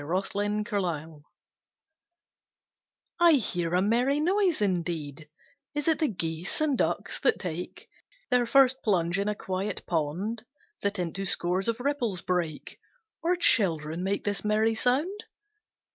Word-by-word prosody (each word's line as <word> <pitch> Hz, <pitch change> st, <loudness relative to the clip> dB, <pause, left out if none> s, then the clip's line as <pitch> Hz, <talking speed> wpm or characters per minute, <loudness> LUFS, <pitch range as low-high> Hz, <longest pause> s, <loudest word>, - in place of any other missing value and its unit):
CHILDREN 200 Hz, +5 st, -1 dB
AT -, -, -5 dB
PLAY 175 Hz, -8 st, -2 dB, 2.1 s
I 345 Hz, -1 st, +7 dB
hear 175 Hz, -, 0 dB
a 180 Hz, -, +3 dB
merry 245 Hz, +7 st, +2 dB
noise 370 Hz, +1 st, +2 dB
indeed: 165 Hz, -6 st, -2 dB, 0.5 s
Is 295 Hz, +1 st, -2 dB
it 320 Hz, -, +3 dB
the 315 Hz, -, +2 dB
geese 165 Hz, -, -4 dB
and 310 Hz, -3 st, +2 dB
ducks -, -, -1 dB
that 470 Hz, -, +3 dB
take 175 Hz, -1 st, -6 dB, 0.4 s
Their 245 Hz, -1 st, +3 dB
first 265 Hz, 0 st, +5 dB
plunge 180 Hz, -3 st, +1 dB
in 200 Hz, -, -1 dB
a 210 Hz, -, -1 dB
quiet 190 Hz, +1 st, -4 dB
pond 175 Hz, +8 st, -2 dB, 0.4 s
That 200 Hz, +1 st, 0 dB
into 180 Hz, +2 st, -3 dB
scores 180 Hz, +3 st, +1 dB
of 230 Hz, +1 st, 0 dB
ripples 245 Hz, -9 st, -1 dB
break 170 Hz, -4 st, -3 dB, 0.4 s
Or 345 Hz, +2 st, +2 dB
children 165 Hz, -, +2 dB
make 195 Hz, +1 st, -1 dB
this 205 Hz, -1 st, -2 dB
merry 215 Hz, +1 st, +2 dB
sound? 295 Hz, -, 0 dB
200 Hz, 135 wpm, -28 LUFS, 175-250 Hz, 2.1 s, I